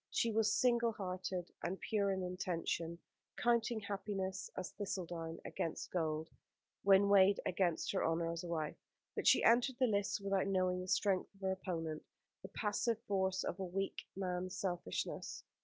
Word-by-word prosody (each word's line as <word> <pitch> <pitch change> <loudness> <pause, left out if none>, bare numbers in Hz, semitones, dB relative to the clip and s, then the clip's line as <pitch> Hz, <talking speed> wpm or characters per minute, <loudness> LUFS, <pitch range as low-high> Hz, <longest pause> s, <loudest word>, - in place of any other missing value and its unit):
She 230 - +1
was 215 -1 +3
single 235 -2 +3
hearted 185 -2 -4
and 185 +2 -2
pure 205 -3 +1
in 190 -1 -1
intention, 170 -2 -2 0.4
counting 235 -1 +2
happiness 195 -1 -3
as 185 - -3
thistledown 170 -5 -4
against 165 - -3
gold, 160 -2 -1 0.5
when 195 0 +6
weighed 200 0 +6
against 175 -3 +1
her 195 - 0
honour 165 +1 +1
as 170 +1 -4
a - - -5
wife; 160 -3 -2 0.4
but - - -2
she - - +6
entered 240 +3 +5
the 260 - +4
lists 205 -2 +1
without 195 -1 +1
knowing 185 -1 +1
the 185 - -6
strength 190 0 +1
of 195 - -23
her 190 0 +1
opponent, 165 -5 -3 0.4
the - - -8
passive 220 +2 0
force 190 -1 0
of 185 - -3
a - - -1
weak 195 +2 -3
man's 185 -1 -2
selfishness. 175 - -3
190 Hz, 160 wpm, -37 LUFS, 175-200 Hz, 0.5 s, when